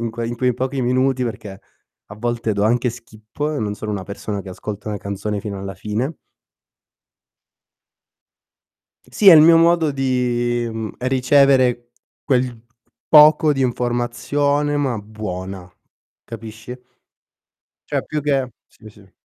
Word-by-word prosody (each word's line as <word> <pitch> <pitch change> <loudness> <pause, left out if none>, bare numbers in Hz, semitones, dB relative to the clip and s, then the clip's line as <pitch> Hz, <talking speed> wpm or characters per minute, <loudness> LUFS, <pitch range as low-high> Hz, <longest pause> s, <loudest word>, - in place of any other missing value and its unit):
in 115 -1 -3
que 115 0 -4
in 120 - -4
quei 125 0 +1
pochi 130 +2 -3
minuti 130 +1 +1
perché 105 -4 -7 0.5
a 105 - -11
volte 120 -1 -2
do 100 +1 0
anche 120 +2 +1
skip, 120 +6 -6
non 105 -1 -2
sono 105 +1 -6
una 100 -2 -4
persona 100 0 -5
che 95 - -11
ascolta 105 +3 -7
una 105 -1 -3
canzone 100 +1 -4
fino 100 -2 -6
alla 95 0 -6
fine. 110 - -3 2.9
Sì 210 - -1
è 170 - +11
il 155 - +8
mio 165 +1 +7
modo 165 -2 +3
di, 125 -3 -1
mhmm, 110 -1 -5
ricevere 130 -1 +3 0.3
quel 125 -3 0 0.5
poco 155 0 +7
di 135 - -3
informazione, 130 +4 0
ma 135 -5 -1
buona, 95 -3 -7 0.6
capisci? 115 +2 -10 1.1
Cioè - - -2
più 150 -1 -3
che 135 -3 0 0.2
sì, 110 - -16
sì. 100 -2 -19
120 Hz, 135 wpm, -20 LUFS, 105-135 Hz, 2.9 s, è